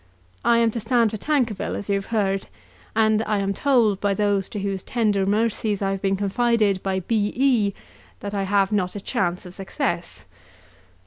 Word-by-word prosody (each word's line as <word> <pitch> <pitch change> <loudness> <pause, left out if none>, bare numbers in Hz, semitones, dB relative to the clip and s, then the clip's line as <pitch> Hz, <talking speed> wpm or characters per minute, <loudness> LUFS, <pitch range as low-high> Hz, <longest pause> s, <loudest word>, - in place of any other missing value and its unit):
I 235 - +4
am 230 -1 +3
to 230 - -3
stand 230 0 +2
for 215 - -4
Tankerville, 240 -6 -1
as 200 - -5
you 200 - +1
have 195 0 -2
heard, 195 -4 0 0.5
and 220 -1 +3
I 215 -1 +1
am 200 0 0
told 230 -6 +2
by 200 -1 +1
those 205 -1 +1
to 210 - -5
whose 195 -1 -2
tender 210 -4 0
mercies 215 0 0
I 195 -1 0
have 195 -1 -3
been 195 -1 +1
confided 205 0 +1
by 190 -1 -1
B. 210 +2 0
E. 240 -7 +2 0.5
that 200 0 -5
I 200 - -1
have 195 +1 +2
not 190 -3 0
a - - -3
chance 180 -2 -2
of 180 - -9
success. 190 - -3
205 Hz, 190 wpm, -23 LUFS, 195-225 Hz, 0.5 s, I